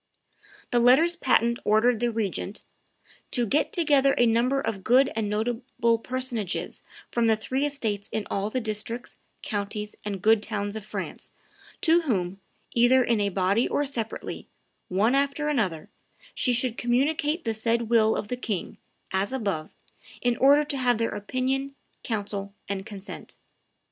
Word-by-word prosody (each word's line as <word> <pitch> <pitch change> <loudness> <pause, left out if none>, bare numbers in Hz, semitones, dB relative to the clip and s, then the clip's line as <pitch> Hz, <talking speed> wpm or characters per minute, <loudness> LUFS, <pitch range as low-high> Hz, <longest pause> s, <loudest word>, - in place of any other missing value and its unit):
The 240 - +3
letters 270 +9 +5
patent 235 -6 +2
ordered 220 +2 +3
the 240 0 +1
regent 210 -2 -3 0.7
"to 245 -2 +1
get 290 +8 +1
together 285 -5 +3
a 240 - +5
number 240 +4 +2
of 200 -8 -3
good 260 +5 +4
and 220 -2 -1
notable 230 +1 0
personages 250 -6 -3 0.3
from 235 -1 +2
the 220 - +4
three 260 +6 -1
estates 220 -8 -3
in 220 - -2
all 200 +1 -1
the 255 - -1
districts, 230 +2 -4 0.3
countries, 210 0 -3
and 200 -2 -3
good 220 +2 +4
towns 205 -1 -3
of 220 - -5
France, 215 - -6 0.5
to 335 +1 +5
whom, 195 - -2 0.3
either 250 +2 +5
in 230 -3 +1
a 200 - +1
body 195 +5 +1
or 290 - 0
separately, 235 -5 -5 0.4
one 205 +7 +2
after 280 +2 +1
another, 190 - -1 0.5
she 250 - +1
should 245 -1 0
communicate 295 +6 +1
the 225 - 0
said 230 +2 0
will 220 -2 +4
of - - -3
the 250 - -3
king, 210 -7 -4 0.3
as 190 +3 0
above, 200 -12 -3 0.4
in 245 -1 +1
order 285 +3 +6
to 290 -1 -3
have 245 -3 +2
their 230 0 0
opinion, 260 +6 -2 0.3
counsel, 200 -2 -4
and 195 0 -4
consent." 200 -1 -9
230 Hz, 155 wpm, -26 LUFS, 210-260 Hz, 0.7 s, order